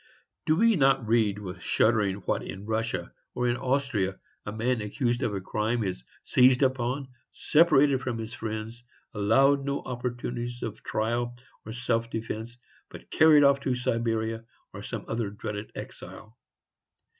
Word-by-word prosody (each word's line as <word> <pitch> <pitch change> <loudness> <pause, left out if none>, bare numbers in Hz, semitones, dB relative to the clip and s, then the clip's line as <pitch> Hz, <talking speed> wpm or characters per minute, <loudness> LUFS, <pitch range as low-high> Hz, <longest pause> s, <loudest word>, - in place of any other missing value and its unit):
Do 155 - +4
we 225 +4 +4
not 135 -5 +3
read 110 -3 +2
with 95 -4 -7
shuddering 105 -4 +1
that - - 0
in 95 +2 -8
Russia, 110 -5 -2 0.2
or 125 - 0
in 120 - +2
Austria, 125 -7 -1 0.3
a - - -2
man 115 +2 0
accused 120 +3 -1
of 100 -7 -2
crime 110 +3 -1
is 90 -11 -4 0.2
seized 130 +1 +4
upon, 130 +1 0 0.2
separated 145 -4 +4
from 120 -3 -3
his 115 0 -6
friends, 110 +1 -5 0.3
allowed 135 +7 +3
no 140 0 -2
opportunities 120 -1 -4
of 110 -2 -5
trial 120 +2 -2 0.3
or - - -6
of 110 - -6
self 115 -1 -1
defence, 115 +1 -5 0.3
but - - -12
hurried 155 -2 +7
off 140 0 +5
to 130 -2 -1
Siberia, 115 -2 -1 0.3
or - - -7
some - - -6
other 115 -2 -2
dreaded 105 0 -6
exile? 110 +2 -9
120 Hz, 150 wpm, -27 LUFS, 110-130 Hz, 0.3 s, hurried